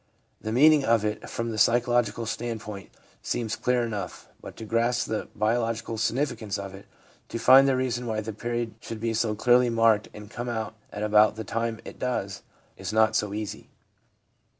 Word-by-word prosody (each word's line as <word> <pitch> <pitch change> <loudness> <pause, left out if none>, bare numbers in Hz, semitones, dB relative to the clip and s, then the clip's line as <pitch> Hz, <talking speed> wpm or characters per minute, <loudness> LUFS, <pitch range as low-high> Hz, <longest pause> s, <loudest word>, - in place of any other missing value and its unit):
The 110 - -4
meaning 150 +4 +6
of 115 -3 +2
it 105 0 -3
from 115 0 -3
the 110 - -3
psychological 120 0 +2
standpoint 110 -3 -5 0.3
seems 115 -3 -2
clear 125 -1 +1
enough, 105 -6 -5
but - - -10
to 110 - -7
grasp 115 +2 +1
the 110 - -3
biological 115 +1 -1
significance 115 -3 -1
of 100 -1 -6
it, 95 - -12 0.4
to - - -4
find 135 +3 +7
the 135 - +3
reason 125 -1 -1
why 110 -1 -1
the 110 +1 -6
period 120 +1 -3
should 115 -1 -7
be 115 0 -1
so 110 -1 0
clearly 125 +2 +4
marked 115 -2 +3
and 105 0 -10
come 120 +3 -5
out 110 -2 -3 0.2
at 105 - -5
about 105 0 +4
the 110 - -5
time 115 +1 -2
it - - -10
does, 100 -6 -2 0.4
is - - -5
not 110 0 +3
so 105 -2 0
easy. 105 0 -6
115 Hz, 180 wpm, -26 LUFS, 105-120 Hz, 0.4 s, find